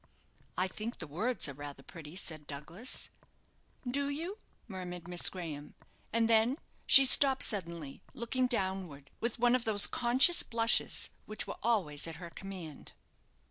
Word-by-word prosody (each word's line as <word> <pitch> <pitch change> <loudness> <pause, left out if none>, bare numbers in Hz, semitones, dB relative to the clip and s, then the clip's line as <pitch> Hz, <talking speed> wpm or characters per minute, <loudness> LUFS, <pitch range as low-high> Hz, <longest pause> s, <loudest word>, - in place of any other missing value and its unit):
"I 185 +1 +2
think 220 +5 -6
the 160 - -6
words 210 - -2
are 140 - -6
rather 145 0 -9
pretty," 160 +1 -11
said 155 -5 -5
Douglas. 165 - -4 0.8
"Do 280 +3 -1
you?" 335 +9 -5 0.3
murmured 180 -4 -7
Miss 175 -1 +3
Graham; 155 -5 -8 0.4
and 230 0 +2
then 225 +4 +3 0.3
she 275 -1 +10
stopped 265 0 +5
suddenly, 170 -8 -3
looking 250 +2 -1
downward, 190 - -3
with 235 +1 -2
one 245 +1 +3
of 255 - -1
those 210 -3 +5
conscious 255 +8 +4
blushes 230 0 +1 0.2
which 215 - -3
were - - -7
always 185 -11 +1
at 165 - -6
her 170 +1 -9
command. 180 -7 -9
195 Hz, 145 wpm, -32 LUFS, 165-240 Hz, 0.8 s, she